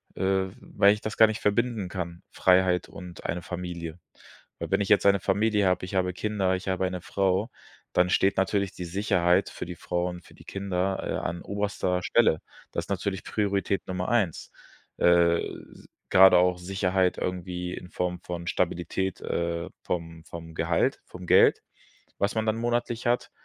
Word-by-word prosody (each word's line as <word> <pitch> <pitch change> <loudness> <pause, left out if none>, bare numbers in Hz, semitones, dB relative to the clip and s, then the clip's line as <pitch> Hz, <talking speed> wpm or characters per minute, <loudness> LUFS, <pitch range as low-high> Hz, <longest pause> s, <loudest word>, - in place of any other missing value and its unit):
äh, 95 0 +1
weil 100 +1 +3
ich 105 - -6
das 110 - -4
gar 110 - +8
nicht 110 0 -4
verbinden 110 -1 0
kann, 85 -2 -6
Freiheit 90 -1 +3
und 90 -1 -10
eine 85 +1 -2
Familie. 85 -1 -6 0.6
Weil - - -4
wenn - - +3
ich 100 - -2
jetzt 105 - +4
eine 100 0 +5
Familie 105 +1 +2
habe, 90 0 +1
ich 95 - -7
habe 90 -1 +1
Kinder, 95 -1 0
ich 95 +1 -7
habe 95 0 0
eine 90 -1 -3
Frau, 95 +4 0 0.4
dann 90 0 +3
steht 95 +1 +3
natürlich 100 0 +1
die 90 - -6
Sicherheit 90 -1 +2
für - - -7
die 90 - -7
Frau 90 +1 -2
und 90 -1 -8
für - - -17
die - - -16
Kinder, 95 -1 -2
äh, - - -2
an 85 +1 -5
oberster 100 -3 -2
Stelle. 95 -9 +3 0.3
Das - - -3
ist - - -23
natürlich 100 -1 -2
Priorität 100 -2 -1
Nummer 90 0 -3
1. 105 -8 0 0.5
Äh, 85 -1 +4 0.3
s - - -16 0.2
grade 95 -1 +8
auch 90 0 +3
Sicherheit 95 0 0
irgendwie 90 -1 -3
in 90 - -8
Form 90 -1 -2
von 85 -1 -6
Stabilität, 90 +1 -1
äh, 85 0 -2
vom 85 -2 -4
vom 80 -1 -9
Gehalt, 80 0 +1
vom 90 0 -10
Geld, - - +5 0.6
was 100 +3 0
man 110 0 0
dann 110 0 +1
monatlich 120 0 -1
hat, 120 +1 0
90 Hz, 175 wpm, -27 LUFS, 90-100 Hz, 0.6 s, gar